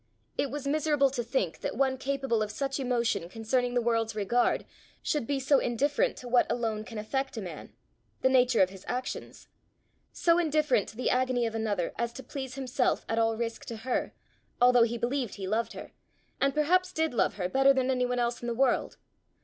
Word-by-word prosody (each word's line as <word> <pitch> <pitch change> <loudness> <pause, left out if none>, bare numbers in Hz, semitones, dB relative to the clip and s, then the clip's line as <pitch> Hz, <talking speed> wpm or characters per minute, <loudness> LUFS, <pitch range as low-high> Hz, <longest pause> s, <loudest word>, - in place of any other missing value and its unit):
It 280 - 0
was 285 +1 -5
miserable 290 -1 +2
to 255 -2 -2
think 230 -8 -1
that - - -4
one 265 0 +2
capable 270 -3 -1
of 215 - -1
such 270 +5 -3
emotion 235 -8 0
concerning 245 +4 -1
the 245 - +2
world's 225 -2 0
regard, 225 +4 +1 0.4
should 290 -7 -1
be 280 -1 0
so 270 +1 +4
indifferent 275 +5 +1
to 250 - -8
what 245 0 +3
alone 220 -3 -1
can 225 0 -9
affect 265 +4 -2
a - - -1
man 175 -5 -8 0.5
the - - +6
nature 250 -5 +4
of 185 - -1
his 190 -1 -12
actions 250 +1 -5 0.6
so 335 0 +3
indifferent 305 - +2
to - - -13
the 250 - 0
agony 255 -1 +1
of 225 - -2
another 210 -6 -1
as 235 0 -1
to 265 - -8
please 265 +1 -6
himself 260 -1 0
at 225 - 0
all 225 0 +2
risk 230 0 -3
to 230 - -6
her, 255 - -1 0.5
although 245 0 +6
he 235 +1 +2
believed 245 0 -2
he 195 - -5
loved 220 +4 -1
her, - - -9 0.5
and 275 -1 +1
perhaps 365 +5 +2
did 320 -2 0
love 235 - +1
her 180 -3 -1
better 270 +7 +4
than 265 -1 +1
any 250 -1 +1
one 250 0 -1
else 240 0 -1
in 240 - -5
the 235 - -1
world. 260 0 +1
245 Hz, 205 wpm, -29 LUFS, 225-270 Hz, 0.6 s, the